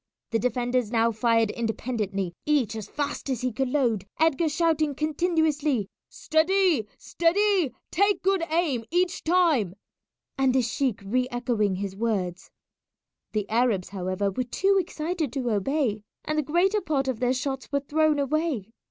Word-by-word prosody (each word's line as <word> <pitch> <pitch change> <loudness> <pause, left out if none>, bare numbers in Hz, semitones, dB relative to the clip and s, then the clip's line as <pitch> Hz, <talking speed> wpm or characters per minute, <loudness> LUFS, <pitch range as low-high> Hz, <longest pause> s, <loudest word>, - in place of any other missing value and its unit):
The 225 - +1
defenders 245 0 0
now 230 0 +2
fired 230 0 +2
independently, 215 -5 -2
each 270 -8 +2
as 215 -2 -6
fast 290 -1 -4
as 255 -4 -1
he 255 0 0
could 265 +3 -1
load, 235 -8 0
Edgar 320 0 +3
shouting 310 -2 +1
continuously 305 - 0 0.2
"Steady! 320 - +2
steady! 365 -2 +1 0.2
take 400 +3 +3
a - - -34
good 385 -1 +2
aim 310 -8 +1
each 355 +2 0
time," 315 - +2 0.6
and 265 -1 +3
the 260 - +3
sheik 240 -1 -1
re 250 +5 +1
echoing 235 -5 0
his 195 0 -4
words. 195 -5 -2 0.8
The 210 -2 -1
Arabs, 225 -5 +1
however, 185 +1 -2
were 255 +7 -2
too 390 +11 +1
excited 330 -4 -2
to 255 -4 -1
obey, 220 +1 0 0.2
and 305 - -1
the 305 - +2
greater 360 +8 +2
part 280 -5 -1
of 255 -4 -2
their 250 0 +2
shots 265 +1 -4
were 280 -1 +1
thrown 305 +1 +2
away. 280 - -1
260 Hz, 150 wpm, -26 LUFS, 225-315 Hz, 0.8 s, Edgar